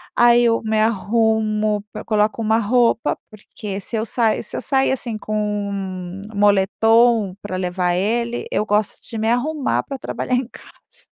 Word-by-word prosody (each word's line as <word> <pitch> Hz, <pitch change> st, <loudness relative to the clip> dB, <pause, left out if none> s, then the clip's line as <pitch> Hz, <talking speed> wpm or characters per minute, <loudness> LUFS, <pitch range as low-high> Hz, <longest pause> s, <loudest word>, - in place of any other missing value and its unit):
Aí 240 Hz, 0 st, +5 dB
eu 230 Hz, -1 st, +2 dB
me 220 Hz, 0 st, 0 dB
arrumo, 215 Hz, -1 st, +1 dB
p -, -, -6 dB
coloco 215 Hz, 0 st, +1 dB
uma 220 Hz, 0 st, +2 dB
roupa, 230 Hz, +1 st, +2 dB
porque 210 Hz, -1 st, -7 dB
se 205 Hz, -, -4 dB
eu 220 Hz, 0 st, -1 dB
sa 230 Hz, -1 st, +1 dB
se -, -, -5 dB
eu -, -, -3 dB
sair, 270 Hz, -1 st, +2 dB
assim, 240 Hz, -4 st, -2 dB
com 210 Hz, -1 st, -2 dB, 0.6 s
moletom 205 Hz, +2 st, +3 dB
para 205 Hz, -2 st, -5 dB
levar 180 Hz, -1 st, -1 dB
ele, 235 Hz, +5 st, -1 dB
eu -, -, +1 dB
gosto 210 Hz, 0 st, 0 dB
de 230 Hz, -, -5 dB
me 220 Hz, +1 st, 0 dB
arrumar 280 Hz, +4 st, 0 dB
para 275 Hz, -, -6 dB
trabalhar 255 Hz, -, -2 dB
em 250 Hz, -1 st, -1 dB
casa. 485 Hz, -, -18 dB
220 Hz, 160 wpm, -20 LUFS, 210-235 Hz, 0.6 s, Aí